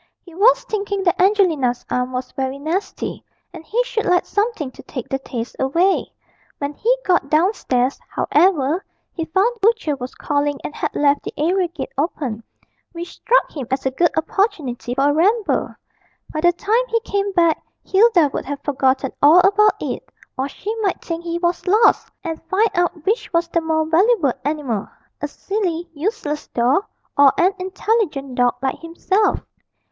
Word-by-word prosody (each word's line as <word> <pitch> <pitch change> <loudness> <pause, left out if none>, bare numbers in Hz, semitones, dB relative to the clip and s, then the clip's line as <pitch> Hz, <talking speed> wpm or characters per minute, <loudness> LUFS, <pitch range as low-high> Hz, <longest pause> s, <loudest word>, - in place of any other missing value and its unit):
He 345 - -15
was 415 +8 +4
thinking 400 -2 -2
that 350 -1 +2
Angelina's 340 - +2
arm 250 0 0
was 255 0 -4
very 265 0 -3
nasty, 325 +8 -3 0.3
and - - -9
he 460 +10 0
should 455 -3 -2
like 360 0 +3
something 410 - -1
to - - -13
take 250 -4 -7
the 270 - -2
taste 240 -3 -6
away. 335 +9 +1 0.5
When 285 0 -3
he 485 +11 +1
got 355 -7 +2
downstairs, 295 - +1
however, 325 0 +2 0.3
he 330 - -3
found 385 +9 +2
the 415 -1 +2
butcher 445 -11 +1
was 255 -1 -7
calling 290 -1 -1
and - - -5
had - - -3
left 285 0 +3
the - - -7
area 355 +4 +1
gate 335 -4 -7
open, 275 -7 -2 0.5
which 345 0 -7
struck - - +2
him 270 -6 -5
as 265 +1 -2
a 265 - +1
good 345 +6 +2
opportunity 305 - -1
for 275 +2 +3
a - - 0
ramble. 405 +7 +1 0.6
By 310 - -2
the 350 +1 +5
time 450 +8 0
he 460 -1 +1
came 400 -2 -1
back 335 -3 +3 0.2
Hilda 380 -7 +4
would - - -3
have 280 +1 -5
forgotten 265 -1 +1
all 315 +5 +7
about 410 +3 +4
it, - - -3 0.3
or 265 +2 -2
she 420 +8 -5
might 390 -4 0
think 335 0 -4
he 340 0 -2
was 345 +1 -1
lost, 425 +5 +4
and 325 -3 -4
find 420 +2 +2
out 350 -3 -1
which 430 +5 0
was 335 -1 +1
the 335 - +1
more 320 -1 0
valuable 335 - +3
animal 280 -9 -2 0.3
a 295 - -1
silly, 350 0 -3
useless 310 -2 -3
doll, 255 - +1 0.3
or 280 -1 +7
an 370 +3 +3
intelligent 370 - -1
dog 245 -1 +2
like 265 - -1
himself. 360 +5 0
335 Hz, 175 wpm, -20 LUFS, 280-390 Hz, 0.6 s, all